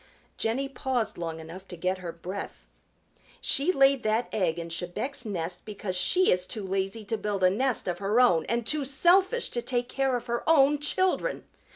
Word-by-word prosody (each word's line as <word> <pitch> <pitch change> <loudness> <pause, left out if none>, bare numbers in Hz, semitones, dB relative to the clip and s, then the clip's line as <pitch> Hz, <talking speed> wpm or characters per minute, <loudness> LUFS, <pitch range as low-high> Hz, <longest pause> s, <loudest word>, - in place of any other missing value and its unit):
Jenny 245 +5 -1
paused 255 -4 -2
long 165 -1 -4
enough 170 +4 -10
to 175 - -9
get 185 +2 -1
her 175 -2 -5
breath. 180 +4 -7 0.7
"She 285 +7 +2
laid 275 -4 +4
that 220 +2 0
egg 175 -5 0
in 170 0 -5
Chebec's 205 +11 -4
nest 180 -3 -4
because 205 -3 -5
she 360 - +3
is 180 0 +1
too 215 -3 -4
lazy 195 +3 -2
to 220 +2 -2
build 205 -2 -2
a 185 - +6
nest 255 +3 0
of 175 -1 -2
her 205 +4 +1
own 180 -11 +5
and 235 0 0
too 300 +4 0
selfish 365 - +3
to 240 - -2
take 245 0 -2
care 270 -1 0
of 245 - -3
her 235 0 -2
own 290 -2 +5
children. 375 +10 0
220 Hz, 190 wpm, -27 LUFS, 185-270 Hz, 0.7 s, a